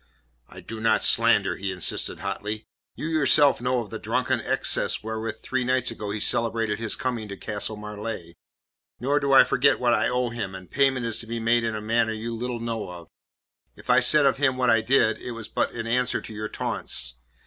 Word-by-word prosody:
"I - - -11
do 110 0 -7
not 110 -1 +2
slander," - - +3
he 95 0 -3
insisted 90 -4 -2
hotly. 105 +1 -4 0.3
"You - - -6
yourself 150 -4 +4
know 125 0 0
of 105 - -14
the 110 - -5
drunken 125 +2 -1
excess - - +1
wherewith 110 0 -4
three 130 -1 -1
nights 130 0 +1
ago 105 - -6
he 105 +1 -3
celebrated 115 -1 +1
his 115 -1 -1
coming 120 -4 -3
to 100 -1 -8
Castle 110 0 -3
Marleigh. 105 -4 -6 0.7
Nor 140 +4 +1
do 140 -1 -1
I 135 - +9
forget 135 +1 +2
what 120 -1 +2
I - - +2
owe 125 0 0
him, 110 -5 -5
and 95 -1 -11
payment 135 -3 +2
is 115 -1 0
to 115 - -5
be 115 +1 -3
made 115 +1 +2
in 115 -1 -2
a 105 - -4
manner 110 +1 +1
you 115 +1 -5
little 120 +1 -4
know 115 -4 -4
of. 85 -2 -10 0.7
If - - -3
I - - +6
said 150 -2 +4
of 135 - +3
him 135 -2 +1
what 125 -2 +3
I 115 - +4
did, 110 -3 +2
it 120 - -6
was 115 -2 -7
but - - -1
in 115 -1 -5
answer 125 +2 +1
to 110 - -10
your 105 0 -5
taunts. - - -3
115 Hz, 215 wpm, -25 LUFS, 110-125 Hz, 0.7 s, I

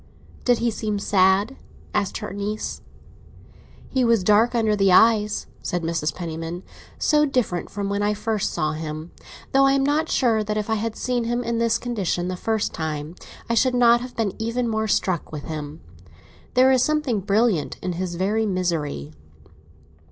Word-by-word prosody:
"Did 245 -1 +4
he 235 0 0
seem 215 -1 -2
sad?" 200 +4 +2 0.4
asked 205 -2 0
her - - -6
niece. 205 +2 -4 1.1
"He 260 -2 0
was 230 -5 +3
dark 215 +5 +4
under 220 -2 +2
the 195 -2 +3
eyes," 210 +1 +4 0.2
said 175 -1 -2
Mrs. 165 -2 -1
Penniman. 165 0 -5 0.3
"So 300 -1 +3
different 250 - -1
from 200 0 -4
when 200 +1 -1
I 210 +1 +1
first 215 0 -1
saw 155 0 -1
him; 155 +1 -6 0.4
though 275 0 +5
I 270 - +4
am 275 0 +2
not 305 +3 +1
sure 225 -4 +2
that 210 0 -2
if 215 +1 -2
I - - +3
had 220 +1 -2
seen 245 -2 -1
him 240 +1 -1
in 235 -1 -1
this 230 0 +2
condition 195 -7 -2
the 185 - -2
first 220 +3 -1
time, 155 -1 -4 0.3
I 235 - 0
should 250 +2 +3
not 240 -1 +5
have 250 0 -8
been 220 -4 -1
even 230 +2 -1
more 220 -1 -1
struck 185 -4 0
with 150 -2 -6
him. 155 0 -6 0.7
There 260 +1 +6
is 260 -1 +4
something 300 -6 +1
brilliant 200 -3 +1
in 180 - -2
his 175 0 -3
very 210 +5 0
misery." 165 - -2
210 Hz, 175 wpm, -23 LUFS, 180-235 Hz, 1.1 s, There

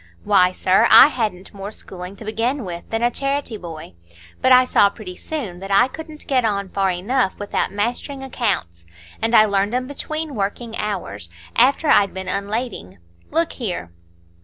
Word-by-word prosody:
Why, 185 -3 +4
sir, 190 +5 +3
I - - +9
hadn't 210 -9 -3
more 200 0 -6
schooling 185 -3 -9
to 215 - -11
begin 230 +4 -1
with 175 -1 -7
than 225 +1 -2
a 240 - +3
charity 275 -2 -2
boy; 165 - -9 0.5
but 260 - +3
I 255 0 +7
saw 205 -5 +4
pretty 200 -3 -10
soon 215 - -5
that 195 +1 -8
I 200 +5 +5
couldn't 310 +2 -10
get 260 -3 +1
on 200 -3 -1
far 195 0 0
enough 190 +5 0
without 205 0 -2
mastering 240 +7 -3
accounts, 190 - -2 0.3
and 225 +1 +2
I 215 - +8
learned 200 +2 0
'em 255 0 -1
between 310 +2 -4
working 225 +2 -3
hours, 105 - -4 0.3
after 270 +6 +3
I'd 200 -8 +4
been 190 0 -5
unlading. 200 - -3 0.3
Look 330 0 +1
here." 180 - -5
210 Hz, 170 wpm, -21 LUFS, 190-255 Hz, 0.5 s, I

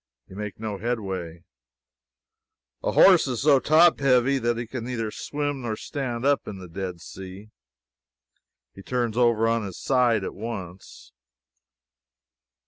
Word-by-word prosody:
You 95 - -13
make 105 0 -6
no 105 -3 -4
headway. 95 -8 -4 1.4
A - - -1
horse 180 -6 +6
is 125 -1 -2
so 140 -2 +5
top 160 +5 +5
heavy 135 0 +3
that 120 -1 0
he 120 - -3
can 120 +1 -6
neither 115 -3 -3
swim 145 +1 -3
nor 115 -3 -3
stand 125 -1 -4
up 140 0 +2
in 100 - -6
the 95 -1 -10
Dead 90 0 -6
Sea. 95 +4 -10 1.2
He 95 - -12
turns 120 0 -2
over 115 -2 +3
on 115 -1 +1
his 95 -3 -7
side 120 -6 +2
at - - -4
once. 100 -5 -8
115 Hz, 140 wpm, -25 LUFS, 100-130 Hz, 1.4 s, horse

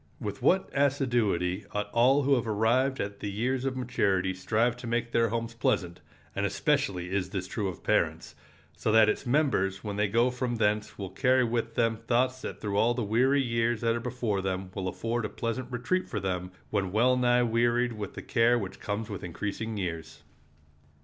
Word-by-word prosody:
With 100 -1 -5
what 190 +1 +3
assiduity 120 -10 +1
ought 105 0 -2
all 130 +5 +4
who 140 +1 +3
have 120 -3 +1
arrived 120 +5 +2
at 100 0 -4
the 105 - -4
years 125 +6 -1
of 130 -1 -1
maturity 95 -7 0
strive 110 +6 +1
to 125 - -8
make 120 0 -1
their 115 -1 +2
homes 115 +1 -3
pleasant—and 90 -6 -3
especially 90 -2 0
is 95 -1 -1
this 95 -2 -3
true 100 +1 -3
of 90 - -7
parents—so 110 - -2
that 110 0 +6
its 125 - -2
members 120 -9 +1
when 105 -2 -4
they 105 0 +2
go 115 +5 +2
from 125 -1 -2
thence 105 -1 0
will 95 -2 -6
carry 130 -1 +3
with 115 -1 -2
them 115 -1 +2
thoughts 125 +3 0
that - - -6
through 100 -2 -2
all 120 +3 +3
the 120 - -1
weary 130 +7 +3
years 115 -1 0
that 115 -1 +2
are - - -1
before 115 -5 -2
them 95 0 -3
will 95 -2 -3
afford 115 +5 -2
a 105 - -2
pleasant 120 +2 -4
retreat 125 +10 -1
for 105 - -2
them 90 -2 -3 0.2
when 100 -3 0
well 120 +5 +3
nigh 125 -1 +3
wearied 120 +1 +2
with 105 -3 -6
the - - -7
care 120 +1 +3
which 100 -5 -5
comes 105 +1 -3
with 100 -3 -6
increasing 105 +5 -4
years. 80 -4 -5
115 Hz, 190 wpm, -28 LUFS, 100-125 Hz, 0.2 s, that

